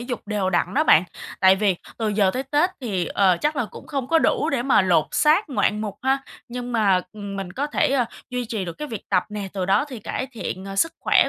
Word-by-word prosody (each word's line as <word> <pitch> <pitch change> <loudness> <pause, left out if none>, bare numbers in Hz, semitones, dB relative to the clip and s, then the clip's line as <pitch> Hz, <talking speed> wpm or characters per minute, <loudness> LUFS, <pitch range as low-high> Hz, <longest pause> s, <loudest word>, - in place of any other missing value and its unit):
dục 245 -1 -5
đều 205 -3 -1
đặn 175 - 0
đó 305 +4 +3
bạn. 170 - +6 0.4
Tại 190 0 +6
vì 195 -2 +1 0.2
từ 225 -2 0
giờ 205 -2 +2
tới 255 +6 -3
Tết 295 +6 +1
thì, 195 -9 -2
ờ, 190 -1 +3
chắc 300 +1 0
là 245 - +1
cũng - - -11
không 275 -5 -3
có 330 - +4
đủ - - +1
để 270 -4 0
mà 255 -5 +4
lột 170 -4 +3
xác 315 +7 +3
ngoạn 215 -5 +1
mục 210 -2 -4
ha. 265 +1 +2 0.3
Nhưng 245 0 -5
mà, 200 -5 +3
ừm, 200 -2 -7
mình 190 -2 -5
có 280 +7 -2
thể, 295 - +1
a, 250 -4 +2 0.2
duy 250 -1 -2
trì 220 -4 -3
được 170 - -5
cái 300 - -5
việc 225 -6 -7
tập 185 -3 +2
nè, 210 -2 -5
từ 190 -2 -2
đó 195 +8 +3
thì 255 -4 -7
cải 240 +4 -4
thiện, 190 -4 -5
ờ, 195 0 -7
sức 330 +11 +2
khỏe - - +4
215 Hz, 255 wpm, -23 LUFS, 195-265 Hz, 0.4 s, bạn